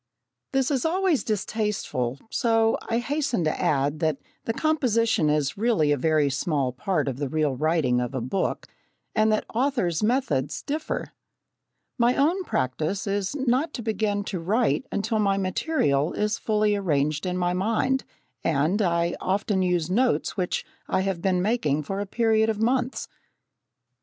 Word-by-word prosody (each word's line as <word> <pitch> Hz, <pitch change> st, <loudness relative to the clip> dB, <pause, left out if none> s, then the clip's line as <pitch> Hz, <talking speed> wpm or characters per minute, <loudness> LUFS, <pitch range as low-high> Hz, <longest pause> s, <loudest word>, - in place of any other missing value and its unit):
This 270 Hz, 0 st, +1 dB
is 265 Hz, -4 st, +1 dB
always 355 Hz, -2 st, +1 dB
distasteful, 205 Hz, -, -2 dB
so 225 Hz, -2 st, +2 dB
I 230 Hz, -, +1 dB
hasten 275 Hz, -, -1 dB
to 155 Hz, -, -1 dB
add 145 Hz, +1 st, +1 dB
that 155 Hz, -4 st, +1 dB, 0.3 s
the -, -, 0 dB
composition 230 Hz, -, +2 dB
is 150 Hz, +3 st, 0 dB
really 215 Hz, -10 st, +2 dB
a -, -, +4 dB
very 155 Hz, +1 st, +2 dB
small 140 Hz, -2 st, 0 dB
part 150 Hz, +2 st, -1 dB
of 130 Hz, -2 st, -2 dB
the 140 Hz, -1 st, -2 dB
real 150 Hz, -2 st, 0 dB
writing 150 Hz, -4 st, +1 dB
of 125 Hz, +2 st, -4 dB
a -, -, 0 dB
book, 130 Hz, +11 st, -2 dB, 0.5 s
and 215 Hz, 0 st, +3 dB
that 215 Hz, -, +1 dB
authors' 235 Hz, -, 0 dB
methods 210 Hz, -, 0 dB
differ. 305 Hz, +2 st, -3 dB, 0.9 s
My 240 Hz, +1 st, +4 dB
own 335 Hz, +7 st, +2 dB
practice 155 Hz, -, -1 dB
is 200 Hz, +3 st, -1 dB
not 270 Hz, +3 st, 0 dB
to 235 Hz, -, -5 dB
begin 210 Hz, -2 st, 0 dB
to 195 Hz, -3 st, -4 dB
write 220 Hz, +9 st, +1 dB
until 220 Hz, +2 st, -1 dB
my 200 Hz, -2 st, +2 dB
material 185 Hz, -, 0 dB
is 210 Hz, +1 st, -1 dB
fully 210 Hz, -1 st, +1 dB
arranged 155 Hz, -3 st, 0 dB
in 180 Hz, 0 st, -1 dB
my 180 Hz, 0 st, +1 dB
mind, 230 Hz, +8 st, +1 dB, 0.4 s
and 165 Hz, +7 st, +1 dB
I 170 Hz, -2 st, +1 dB
often 195 Hz, +1 st, 0 dB
use 180 Hz, -2 st, 0 dB
notes 245 Hz, +5 st, +1 dB
which 180 Hz, -3 st, -2 dB, 0.2 s
I -, -, +1 dB
have 190 Hz, -3 st, -2 dB
been 180 Hz, -1 st, +1 dB
making 155 Hz, -, +1 dB
for 195 Hz, +7 st, -4 dB
a 205 Hz, -, -3 dB
period 220 Hz, 0 st, +2 dB
of 215 Hz, -1 st, -1 dB
months. 250 Hz, +3 st, 0 dB
200 Hz, 155 wpm, -25 LUFS, 155-230 Hz, 0.9 s, a